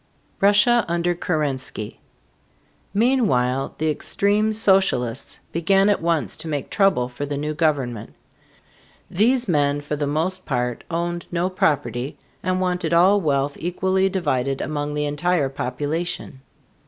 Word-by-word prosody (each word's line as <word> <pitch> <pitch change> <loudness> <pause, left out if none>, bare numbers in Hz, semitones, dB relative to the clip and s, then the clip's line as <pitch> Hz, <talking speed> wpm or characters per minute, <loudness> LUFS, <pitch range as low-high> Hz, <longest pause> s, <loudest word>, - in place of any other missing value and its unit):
RUSSIA 210 +4 +5
UNDER 170 +1 0
KERENSKY. 145 -10 -3 0.9
Meanwhile 195 - +1
the 155 0 +1
extreme 205 +7 +1
socialists 190 - +1
began 195 +4 +3
at 205 - +1
once 165 -2 0
to - - -8
make 145 -4 -3
trouble 195 -11 +2
for 130 +3 -6
the 145 0 -3
new 150 +2 -2
government. 135 -8 -1 1.0
These 240 +6 +2
men 145 -4 +2
for 145 +1 -4
the 145 -1 -2
most 175 +6 -1
part 125 -3 -2
owned 175 0 -3
no 175 +2 0
property 145 -6 -1 0.2
and 185 +1 0
wanted 180 -3 0
all 190 +4 +5
wealth 140 -3 0
equally 190 +2 +1
divided 140 -8 -1
among 145 0 -3
the 150 0 0
entire 150 0 0
population. 145 +2 -3
160 Hz, 130 wpm, -22 LUFS, 140-185 Hz, 1.0 s, RUSSIA